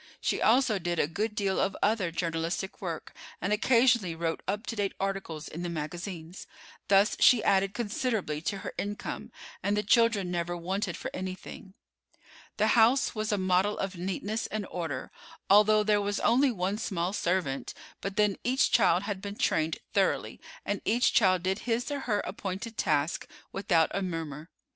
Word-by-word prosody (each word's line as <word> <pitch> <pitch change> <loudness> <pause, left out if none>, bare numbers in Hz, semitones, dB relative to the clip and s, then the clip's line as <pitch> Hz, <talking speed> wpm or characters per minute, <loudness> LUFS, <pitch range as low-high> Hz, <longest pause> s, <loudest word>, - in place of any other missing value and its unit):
She - - -1
also 230 -2 +4
did 175 -1 -2
a - - +3
good 210 +7 -3
deal 195 -3 0
of 195 +1 0
other 205 -4 +2
journalistic 165 +2 -3
work, 170 -5 -5 0.3
and 200 +4 0
occasionally 230 -5 +3
wrote 165 0 -2
up 205 +2 -2
to 230 - -4
date 205 -2 -1
articles 195 -6 -3
in 165 - -7
the 175 - -3
magazines. 170 +2 -6 0.4
Thus 200 +2 +4
she 240 -4 +6
added 195 +1 +2
considerably 210 - -2
to 195 +4 -2
her - - -4
income, 205 +1 -5 0.3
and 205 +1 0
the 210 - +1
children 215 -4 +3
never 175 0 -2
wanted 185 +1 -2
for - - -5
anything. 185 +1 -7 0.8
The 215 +1 +3
house 240 +4 +4
was 215 -1 -2
a 205 - +1
model 185 +2 +2
of 195 0 -3
neatness 195 +5 -3
and 215 -1 -3
order, 160 -7 -4 0.4
although 210 +1 +6
there 210 -1 +3
was 205 0 -1
only 265 +4 +4
one 200 -2 -2
small 185 -4 -2
servant; 175 -9 -1 0.3
but 195 0 -4
then 210 -1 +2
each 255 +2 +2
child 190 -5 +4
had 200 -2 -4
been 200 0 -6
trained 160 -5 +1 0.2
thoroughly, - - 0 0.2
and 205 - -2
each 240 +3 +2
child 185 -4 +4
did 190 +2 0
his 240 +5 0
or 285 - -2
her 215 -6 0
appointed 195 +4 -5
task 150 -2 0 0.3
without 175 -5 +2
a 200 - -1
murmur. 165 -3 -5
195 Hz, 170 wpm, -29 LUFS, 175-215 Hz, 0.8 s, she